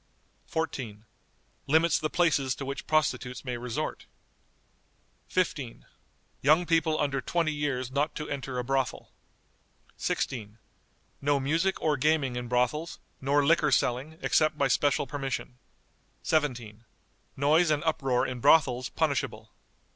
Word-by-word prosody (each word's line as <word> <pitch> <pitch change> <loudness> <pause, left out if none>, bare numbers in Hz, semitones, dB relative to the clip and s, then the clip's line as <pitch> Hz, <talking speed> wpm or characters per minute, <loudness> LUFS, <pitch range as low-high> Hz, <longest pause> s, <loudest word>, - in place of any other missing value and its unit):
14. 120 -10 -4 0.6
Limits 160 +3 +4
the 155 - -1
places 150 -7 +2
to 140 - -6
which 135 +1 -5
prostitutes 150 -5 0
may 125 -1 -2
resort. 120 -1 -4 1.2
"15. 145 -9 -2 0.6
Young 155 +6 +4
people, 160 -2 +2
under 135 -2 0
twenty 165 0 0
years, 135 -4 -2
not 145 +3 0
to 155 - -4
enter 135 -2 -4
a 125 - -1
brothel." 135 0 -2 0.9
"16. 110 -4 -3 0.6
No 145 0 +2
music 165 +8 0
or 150 -2 +1
gaming 140 -2 +1
in 120 0 -4
brothels, 125 +7 0 0.2
nor 140 +2 +2
liquor 155 -1 +3
selling, 135 +6 0
except 155 -1 +2
by 140 - +2
special 140 +2 +2
permission." 135 -2 -4 0.6
"17. 120 -8 -1 0.5
Noise 155 +5 +4
and 150 0 +1
uproar 135 -6 +1
in 125 -1 -4
brothels 130 -3 +4
punishable." - - -2
140 Hz, 125 wpm, -28 LUFS, 125-155 Hz, 1.2 s, Limits